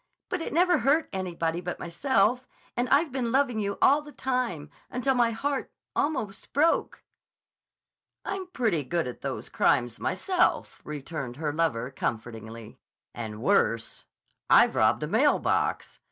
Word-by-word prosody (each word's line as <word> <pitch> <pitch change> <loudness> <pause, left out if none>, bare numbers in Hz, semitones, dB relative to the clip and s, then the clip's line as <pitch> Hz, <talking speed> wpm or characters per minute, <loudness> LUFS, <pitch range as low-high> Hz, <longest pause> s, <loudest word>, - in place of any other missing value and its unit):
But 360 - -2
it - - -4
never 355 +1 +3
hurt 280 +7 +2
anybody 175 -3 -2
but 175 0 -5
myself—and 245 +5 -1
I've 290 +2 +3
been 245 -3 -1
loving 260 -4 +2
you 200 -1 -2
all 285 +2 +6
the 295 0 -12
time—until 250 - -2
my 240 -2 +3
heart—almost 260 -2 -3
broke." 315 +4 +1 1.2
"I'm 390 -2 -4
pretty 225 - 0
good 170 +5 -1
at 125 - -7
those - - -4
crimes 120 -2 +1
myself," 370 -2 0
returned 145 -3 -6
her 150 +1 -2
lover 140 -6 0
comfortingly. 115 -2 -5 0.3
"And 110 -1 -6
worse. 115 0 +1 0.4
I've - - +6
robbed - - +3
a - - -1
mail - - +3
box. - - -1
210 Hz, 130 wpm, -27 LUFS, -, 1.2 s, all